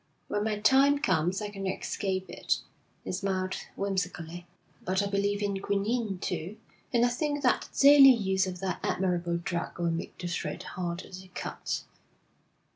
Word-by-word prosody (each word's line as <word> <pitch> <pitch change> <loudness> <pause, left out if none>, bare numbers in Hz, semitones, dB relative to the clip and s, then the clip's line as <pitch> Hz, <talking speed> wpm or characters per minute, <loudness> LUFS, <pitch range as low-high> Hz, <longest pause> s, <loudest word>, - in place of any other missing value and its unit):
When 205 - 0
my 215 -1 0
time 270 +7 +5
comes, 185 - +1
I 210 - -3
cannot 195 -2 -3
escape 190 -2 -2
it.' - - -1 0.5
He - - -4
smiled 185 0 -1 0.2
whimsically. 175 -3 -3 0.4
'But 190 +2 +1
I - - 0
believe 200 +1 0
in 200 -1 -1
quinine, 200 +1 0
too, 180 +3 -4 0.3
and 240 -2 +4
I - - +3
think 290 +3 -1
that 250 - +2
the - - -6
daily 280 -1 +10
use 190 -6 +3
of 180 -1 -6
that 185 -3 -2
admirable 175 -2 0
drug 170 0 -3
will 170 -1 0
make 165 +1 -4
the 180 - -4
thread 170 -3 -3
harder 175 -1 -5
to 185 0 -10
cut.' - - -3
195 Hz, 165 wpm, -29 LUFS, 180-210 Hz, 0.5 s, daily